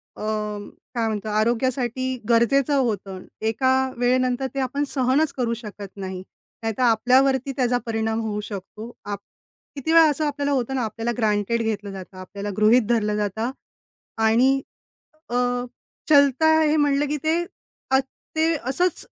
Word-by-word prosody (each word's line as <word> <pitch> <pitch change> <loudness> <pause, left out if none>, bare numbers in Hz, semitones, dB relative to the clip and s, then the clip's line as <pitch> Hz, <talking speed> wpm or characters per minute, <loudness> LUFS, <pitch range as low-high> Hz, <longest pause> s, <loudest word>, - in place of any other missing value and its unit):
अ, - - -6 0.7
काय 230 -1 +1
म्हणतो 215 0 -3
आरोग्यासाठी 245 +3 0
गरजेचं 260 +5 +3
होतं. 200 -7 -2 0.2
एका 245 +4 +2 0.2
वेळेनंतर 255 +1 +1
ते 275 - -3
आपण 280 +3 -1
सहनच 270 +3 +1
करू 235 -2 0
शकत 205 -2 -8
नाही. 190 -1 -5 0.4
नाहीतर 225 +3 -1
आपल्यावरती 260 +3 +3
त्याचा 245 -1 +2
परिणाम 225 0 -1
होऊ 210 -1 -3
शकतो. 210 +3 -8
आप 205 -1 -4 0.6
किती 285 +3 -2
वेळा 330 -1 +8
असं 300 +1 0
आपल्याला 285 -1 -1
होतं 265 -1 0
ना 255 - 0
आपल्याला 225 +2 -2
ग्रँटेड 220 0 +1
घेतलं 210 -2 -2
जातं. 190 -1 -10
आपल्याला 200 +2 -6
गृहीत 220 +4 +5
धरलं 210 -3 +1
जातं 210 +3 -2 0.7
आणि 255 +5 +4 0.7
अ, 240 - -3 0.7
चलता 285 +1 +5
हे 305 0 +3
म्हणलं 290 -1 +2
की 300 - -1
ते 330 +2 +1 0.5
अ, 265 - +5 0.4
ते 320 +1 +3
असंच 305 +8 0
240 Hz, 140 wpm, -23 LUFS, 215-270 Hz, 0.7 s, वेळा